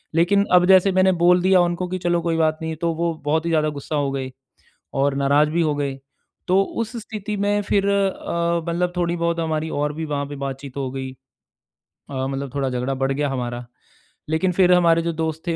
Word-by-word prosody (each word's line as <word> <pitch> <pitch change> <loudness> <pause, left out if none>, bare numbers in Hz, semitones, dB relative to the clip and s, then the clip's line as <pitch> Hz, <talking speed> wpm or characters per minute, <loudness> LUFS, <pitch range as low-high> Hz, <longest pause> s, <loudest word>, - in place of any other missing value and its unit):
लेकिन 200 +4 +3
अब 180 0 +6
जैसे 190 +1 +6
मैंने 190 0 +4
बोल 180 0 +5
दिया 185 -1 +5
उनको 175 +1 -1
कि 185 - -2
चलो 175 -1 0
कोई 165 -1 -1
बात 155 -1 +2
नहीं 160 0 -3
है, - - -4
तो 170 0 -1
वो 170 +1 -1
बहुत 160 +2 +1
ही 170 - 0
ज़्यादा 155 -1 +2
गुस्सा 150 - -5
हो 145 -2 0
गए 130 -1 -4 0.7
और 140 0 +2
नाराज़ 140 +2 +3
भी 170 +2 0
हो 150 -2 +1
गए। 140 -2 -3 0.5
तो 190 +2 +4 0.2
उस 230 +2 -7
स्थिति 215 -1 -5
में 205 +1 +1
फिर 200 0 +1
अ, 170 -4 0
मतलब 175 +1 0
थोड़ी 175 0 0
बहुत 170 0 -1
हमारी 160 -1 -2
और 150 0 0
भी 160 +1 -4
वहाँ 145 -1 -2
पे 145 0 -8
बातचीत 135 -1 -6
हो 130 -2 -2
गई। 135 -1 -5 1.0
अ, 130 -1 -2
मतलब 135 -1 -5
थोड़ा 135 -2 0
झगड़ा 125 +2 -2
बढ़ 135 +1 -1
गया 145 +1 -1
हमारा। 120 -2 -4 0.6
लेकिन 160 +4 +1
फिर 180 0 +4
हमारे 170 -2 +4
जो 170 - -1
दोस्त 160 0 -3
थे 170 - 0
165 Hz, 215 wpm, -22 LUFS, 140-180 Hz, 1.0 s, अब